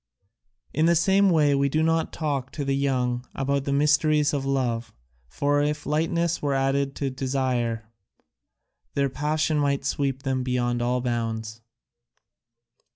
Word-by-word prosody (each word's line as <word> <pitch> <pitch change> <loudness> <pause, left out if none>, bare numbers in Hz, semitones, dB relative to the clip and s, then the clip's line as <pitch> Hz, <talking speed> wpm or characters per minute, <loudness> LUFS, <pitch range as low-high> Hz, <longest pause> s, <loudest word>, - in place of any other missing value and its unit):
In 155 +3 +2
the 170 - +4
same 195 +4 +4
way 150 -4 +4
we 140 0 +2
do 155 +3 +1
not 165 0 +1
talk 140 -5 -3
to 145 - -4
the 135 0 +1
young 125 -3 0
about 140 0 -1
the 140 - -1
mysteries 150 +1 +3
of 140 -2 -1
love, 120 -4 -1 0.4
for 145 - +1
if 150 +1 -1
lightness 165 +3 0
were 140 -2 0
added 135 +1 0
to 140 -2 -2
desire, 130 -4 -1 1.1
their 140 -1 +1
passion 150 +3 0
might 140 -1 0
sweep 135 -1 -1
them 130 -1 -1
beyond 120 -1 -1
all 125 +1 0
bounds." 115 -2 -3
140 Hz, 145 wpm, -25 LUFS, 125-150 Hz, 1.1 s, the